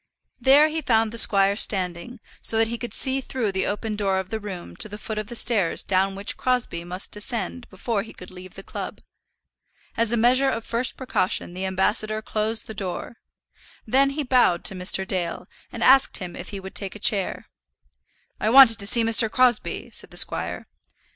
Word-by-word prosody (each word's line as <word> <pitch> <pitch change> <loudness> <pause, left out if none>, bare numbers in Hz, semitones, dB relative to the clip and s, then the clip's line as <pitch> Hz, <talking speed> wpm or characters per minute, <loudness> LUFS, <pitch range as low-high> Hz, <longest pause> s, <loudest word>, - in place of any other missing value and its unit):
There 275 +5 +5
he 320 +1 -3
found 225 -5 +1
the 230 - +3
squire 200 -1 +5
standing, 190 +4 -1 0.2
so 225 - 0
that 225 0 +2
he 235 0 -4
could 240 -3 -6
see 265 0 0
through 250 -5 -3
the 190 0 -1
open 210 +1 -3
door 195 -2 0
of 190 0 -5
the 220 - -3
room 195 -4 -9
to 215 - -6
the 205 - -8
foot 215 0 -5
of 215 - -6
the 240 - -8
stairs 215 -8 +2
down 195 0 0
which 200 +1 -4
Crosbie 250 -9 -1
must 180 +2 -5
descend 235 +3 -1
before 200 +2 -3
he 220 - -10
could 180 - -13
leave 185 0 -12
the 195 - -10
club. - - -8 0.9
As 230 -1 0
a 240 - +1
measure 255 +4 +3
of 230 -3 -4
first 235 +2 -1
precaution 190 -8 -1
the 190 +1 -3
ambassador 210 +3 0
closed 220 +1 -1
the 220 - -8
door; 195 +3 -4 0.7
then 270 +5 +3
he 290 +2 -3
bowed 245 -10 +2
to - - 0
Mr. 185 +1 +1
Dale, 175 -3 -4 0.3
and 235 - -5
asked 270 +1 +5
him 180 -3 -7
if - - -8
he 200 - -7
would 190 0 -10
take 195 -1 -4
a - - -10
chair. 205 -3 +1 0.9
"I 215 - 0
wanted 250 -2 +7
to 200 - +1
see 230 +2 +2
Mr. 225 0 +5
Crosbie," 245 -1 0
said - - -6
the - - -8
squire. - - 0
215 Hz, 200 wpm, -23 LUFS, 190-240 Hz, 0.9 s, wanted